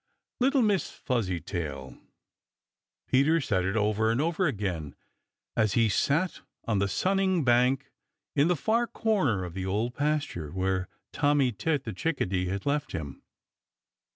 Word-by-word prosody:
"Little 265 +1 +3
Miss 205 -4 +1
Fuzzytail!" 85 - -3 1.1
Peter 145 +6 +4
said 100 - 0
it 95 +2 -1
over 110 +1 +2
and 115 +2 +1
over 170 +4 +1
again, 95 - -3 0.6
as 110 -3 +2
he 115 -2 +3
sat 150 - +1 0.2
on 105 -4 +1
the 100 - +2
sunning 190 - +1
bank 125 +2 +2 0.4
in 145 +2 +4
the 180 - +3
far 230 - +1
corner 155 - +1
of 85 - -7
the 95 0 -4
Old 110 +6 -1
Pasture, 145 - -1
where 95 +1 -1 0.3
Tommy 145 -3 +3
Tit 145 +5 -1
the 110 - -5
Chickadee 95 - -1
had 100 +2 -3
left 145 -1 -1
him. 75 -7 -5
120 Hz, 140 wpm, -28 LUFS, 95-155 Hz, 1.1 s, Peter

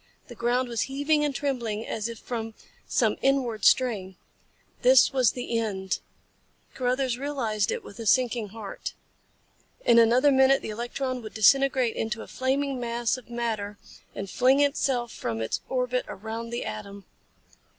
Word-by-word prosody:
The - - -8
ground 240 +2 0
was 235 -2 -2
heaving 290 +2 +1
and 290 -2 -1
trembling 235 -6 -2
as 220 +1 -3
if 230 - -7
from 225 -1 -5 0.3
some - - +1
inward 255 -6 +1
strain. 205 -8 +3 0.7
This - - +6
was 255 -5 +3
the 240 -2 -2
end. 190 -4 -2 0.7
Carruthers 255 -1 0
realized 235 -8 -1
it - - -3
with 200 - -12
a 225 - -4
sinking 240 -1 +2
heart. 210 -1 -7 0.9
In 235 -1 +6
another 245 +5 +5
minute 265 0 +4
the - - -4
electron 250 +3 -3
would 215 - -10
disintegrate 260 +2 +4
into 225 +1 -3
a - - -12
flaming 270 +1 -1
mass 235 -1 -1
of 255 -2 -12
matter 220 -4 -3 0.4
and 195 - -4
fling 255 +7 +3
itself 270 -4 +1
from 115 -1 -4
its 110 - -2
orbit 250 -1 0
around 220 +3 -6
the 235 +1 -4
atom. 200 -2 -7
240 Hz, 150 wpm, -26 LUFS, 220-265 Hz, 0.9 s, This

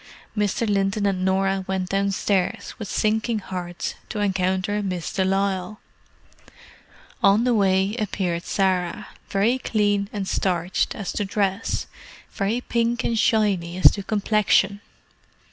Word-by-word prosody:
Mr. 210 +2 0
Linton 200 0 +1
and 190 -2 0
Norah 190 0 +1
went 190 -1 -2
downstairs, 195 -1 0
with 215 - -5
sinking 220 +3 0
hearts, 180 -3 -5 0.2
to 215 - -4
encounter 190 +1 0
Miss 180 -4 -3
de 190 - +1
Lisle. 195 +2 -1 1.4
On 200 +3 +5
the 250 0 +2
way 195 -1 +2
appeared 180 -5 -2
Sarah; 190 +1 0 0.2
very 220 +6 +2
clean 205 -4 0
and 200 -2 -4
starched 180 -1 0
as 200 -4 -4
to 210 - -1
dress, 195 +1 -1 0.5
very 210 +5 -1
pink 235 0 0
and 230 -1 0
shiny 195 -7 +1
as 185 - +8
to 200 - -5
complexion. 205 -1 +2
195 Hz, 130 wpm, -23 LUFS, 190-210 Hz, 1.4 s, as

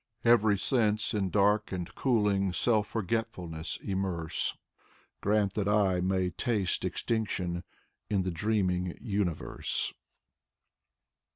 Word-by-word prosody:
Every 110 -3 +5
sense 110 -1 +1
in 100 -3 0
dark 105 +2 +2
and 90 -2 -4
cooling 105 -7 +2
Self 110 +1 +2
forgetfulness 95 -7 -3
immerse, 95 -4 -1 0.3
— - - -33
Grant 100 -1 +2
that 100 -2 -1
I 100 -3 +3
may 95 0 +1
taste 100 0 -1
extinction 95 -6 -1 0.5
In 100 -3 +1
the 90 - -1
dreaming 90 -1 0
universe. 100 -8 -1
100 Hz, 105 wpm, -30 LUFS, 90-105 Hz, 0.5 s, Every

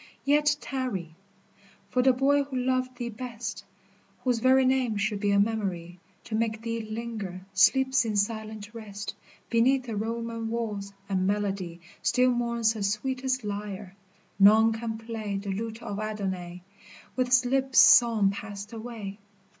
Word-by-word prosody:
Yet 295 +1 +4
tarry! 235 - -4 0.8
for 250 - +3
the 260 +1 +5
boy 275 +3 +3
who 275 -1 -8
loved 255 0 0
thee 240 -1 -3
best, 235 +1 -6 0.6
Whose 250 -3 +1
very 260 +2 +5
name 255 -4 +1
should 205 0 -1
be 205 0 0
a 200 0 +4
memory 190 -5 -1 0.2
To - - -9
make 220 0 -1
thee 230 0 -2
linger, 215 -4 -5
sleeps 260 +6 +4
in 220 -2 -2
silent 215 0 -2
rest 210 -2 -7 0.4
Beneath 255 +3 +3
the 230 -3 -5
Roman 230 +1 -3
walls, 210 -4 -3 0.2
and 185 -1 0
melody 195 -4 -2 0.2
Still 250 +1 +3
mourns 235 -2 +1
her 220 - -6
sweetest 255 +5 -1
lyre, 205 -2 -5 0.4
none 220 +3 +7
can 225 0 -4
play 220 -3 -4
The 200 0 -4
lute 225 +3 -5
of 205 -3 -4
Adonais, 190 -5 -4 0.5
with 255 -1 +1
his 250 0 +4
lips 265 +1 0
Song 225 -4 +7
passed 205 +1 -7
away. 220 -3 -7
225 Hz, 145 wpm, -27 LUFS, 205-245 Hz, 0.8 s, none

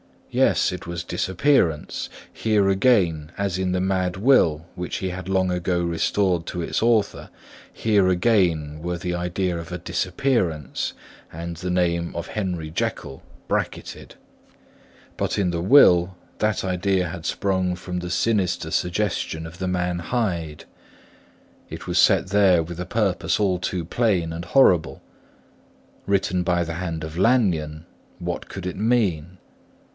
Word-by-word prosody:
Yes, - - +3
it - - -7
was 85 -1 -4
disappearance; 90 - 0 0.2
here 105 -3 +1
again, 90 -7 +2
as 100 -2 -1
in 95 -1 0
the 90 - 0
mad 90 -1 0
will 95 - +3
which 90 0 -4
he 95 - -2
had 90 0 -6
long 95 -1 +1
ago 90 0 0
restored 85 +1 0
to 90 - -4
its - - -2
author, 115 -2 +1 0.4
here 105 -4 +2
again 90 -6 +2
were 90 +1 -3
the 90 0 -3
idea 90 0 -1
of 85 0 -9
a - - -2
disappearance 90 - -1 0.4
and 85 +1 -6
the 90 +2 -4
name 85 -1 0
of 85 0 -4
Henry 90 -7 -3
Jekyll 70 -3 -3 0.3
bracketted. - - -3 1.0
But - - -1
in 95 -4 +1
the 85 -1 -2
will, 90 -5 +6 0.2
that 110 -2 0
idea 95 -1 0
had 85 -2 -7
sprung 95 -2 0
from 90 0 -5
the 90 0 -5
sinister 90 -5 0
suggestion 90 -3 -1
of 80 +3 -10
the 95 - -2
man 90 -1 -1
Hyde; 85 -7 -2 1.1
it - - -8
was 90 0 +1
set 95 -3 +4
there 95 -4 +4
with 85 +1 -8
a 90 - -3
purpose 95 -6 0
all 95 -4 +1
too 90 0 -2
plain 90 -5 0
and 85 +1 -6
horrible. 90 -12 +3 1.1
Written 95 -2 +1
by 90 0 +1
the 80 0 -5
hand 85 -2 -4
of 80 +1 -7
Lanyon, 85 -9 +1 0.3
what - - -4
should - - -7
it 90 - -4
mean? 95 -7 0
90 Hz, 145 wpm, -23 LUFS, 85-95 Hz, 1.1 s, will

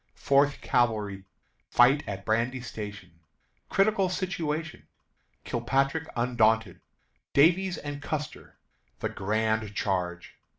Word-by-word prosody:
Fourth 140 +1 +2
Cavalry 105 -5 0 0.4
Fight 135 +5 +5
at 100 -1 -5
Brandy 115 +4 0
Station. 105 -7 -8 0.5
Critical 195 -1 +2
Situation. 165 -4 -3 0.6
Kilpatrick 135 +6 0
Undaunted. 115 -2 +2 0.5
Davies 180 +6 +4
and 145 -1 -6
Custer. 150 0 -5 0.4
The - - -3
Grand 110 +1 -1
Charge. 90 -4 -2
120 Hz, 90 wpm, -28 LUFS, 105-150 Hz, 0.6 s, Fight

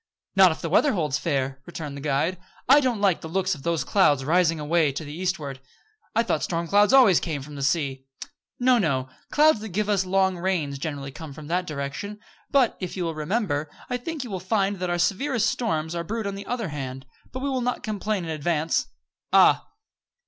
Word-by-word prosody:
"Not 190 -2 +7
if 160 - -6
the 165 - -3
weather 285 - +4
holds 150 -7 0
fair," 135 -3 -1
returned 155 -4 -6
the 140 - -7
guide. 150 +5 0 0.3
"I 275 +4 +8
don't 250 -7 0
like 195 -5 +2
the - - -6
looks 190 +2 0
of 145 - -8
those 170 +1 0
clouds 145 -9 +3
rising 165 0 +3
away 155 0 +2
to 150 +4 -5
the 145 - -8
eastward." 155 -6 -3 0.5
"I 230 - +4
thought 160 -9 0
storm 170 -1 -2
clouds 205 +4 +4
always 250 -10 +7
came 150 -5 -4
from 150 +2 -11
the 140 - -6
sea." 140 -2 0 0.5
"No, 250 -1 +4
no. 135 - 0 0.2
Clouds 300 -5 +5
that 220 +1 -7
give 210 +3 -1
us 200 -2 +2
long 190 -1 +1
rains 165 -7 -1
generally 140 -2 -4
come 155 +1 -9
from 150 +1 -10
that 180 +1 0
direction; 150 +9 -5 0.3
but, 265 -5 +3
if 185 0 -5
you 180 - -1
will 165 -1 -2
remember, 155 -2 -1 0.2
I 250 - +1
think 300 +3 -5
you 240 - -8
will 190 - -3
find 195 +2 0
that 180 -1 -2
our 175 - 0
severest 220 +7 +1
storms 160 -9 -1
are 170 -1 -2
brewed 220 +5 -3
on 200 - -2
the 200 +1 -8
other 235 -6 -2
hand. 135 -2 -6 0.3
But 260 - -5
we 280 - 0
will 260 -1 -1
not 250 +1 -2
complain 210 -2 -2
in 160 - -4
advance. 160 +1 0 0.4
Ah!" - - +5
175 Hz, 215 wpm, -25 LUFS, 150-205 Hz, 0.5 s, I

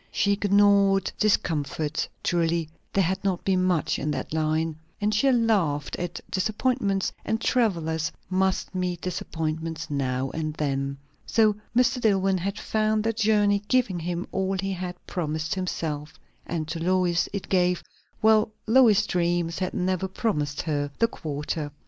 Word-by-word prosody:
She 200 - +2
ignored 200 -1 +4
discomforts 155 -6 0
(truly 170 -1 +1 0.2
there 195 - +2
had 190 +2 -1
not 190 -3 -1
been 185 -1 +2
much 180 -4 +1
in 150 - -2
that 150 - -3
line), 160 0 0 0.2
and 210 0 +1
she 265 +6 +3
laughed 200 - +1
at 175 -1 -4
disappointments; 205 0 0
and 220 - -1
travellers 165 - +1 0.2
must 190 0 0
meet 180 -2 -2
disappointments 160 -2 -3
now 130 -1 -1
and 155 -1 -3
then. 140 -2 -1 0.3
So 215 -2 +3 0.2
Mr. 250 0 +3
Dillwyn 195 -3 +2
had 200 +4 -3
found 215 0 0
the 225 +1 +1
journey 205 -2 +3
giving 245 -9 +2
him 175 +2 -3
all 190 0 -1
he 195 +1 -2
had 180 -1 -4
promised 155 -3 -2
himself; 160 -5 -3 0.3
and 160 -3 -2
to 165 +1 -3
Lois 180 -1 +2
it 200 -1 -4
gave 180 -1 +2 0.4
well 220 0 +5 0.2
Lois's 220 -3 +5
dreams 175 -2 0
had 185 -1 -2
never 185 +1 0
promised 150 -8 -1
her 145 -3 -1
the 230 - +4
quarter. 150 -5 -4
185 Hz, 145 wpm, -26 LUFS, 160-205 Hz, 0.4 s, well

